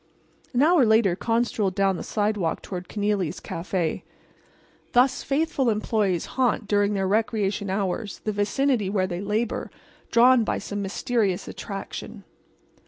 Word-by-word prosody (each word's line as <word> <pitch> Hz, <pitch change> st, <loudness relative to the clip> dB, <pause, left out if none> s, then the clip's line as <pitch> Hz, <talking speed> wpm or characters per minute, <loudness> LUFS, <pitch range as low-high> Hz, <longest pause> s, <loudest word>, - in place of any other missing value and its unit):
An 255 Hz, +1 st, +2 dB
hour 330 Hz, -2 st, +5 dB
later 220 Hz, -5 st, +4 dB
Con 230 Hz, +4 st, +1 dB
strolled 200 Hz, -5 st, -1 dB
down 195 Hz, -1 st, +2 dB
the -, -, -5 dB
sidewalk 205 Hz, -5 st, -1 dB
toward 180 Hz, -2 st, -6 dB
Kenealy's 205 Hz, -5 st, -1 dB
café. 170 Hz, -1 st, -2 dB, 0.9 s
Thus 250 Hz, +1 st, +4 dB
faithful 280 Hz, -2 st, 0 dB
employees 210 Hz, -4 st, 0 dB
haunt, 240 Hz, -4 st, 0 dB
during 205 Hz, 0 st, +2 dB
their 195 Hz, -1 st, 0 dB
recreation 205 Hz, -1 st, 0 dB
hours, 195 Hz, +2 st, -2 dB
the 215 Hz, -, -1 dB
vicinity 210 Hz, +1 st, +1 dB
where 190 Hz, -2 st, +1 dB
they 180 Hz, -1 st, -4 dB
labor, 210 Hz, +3 st, -2 dB, 0.4 s
drawn 240 Hz, +1 st, +6 dB
by -, -, -1 dB
some 205 Hz, 0 st, -4 dB
mysterious 200 Hz, -1 st, -1 dB
attraction. 200 Hz, +1 st, -7 dB
210 Hz, 135 wpm, -25 LUFS, 195-230 Hz, 0.9 s, drawn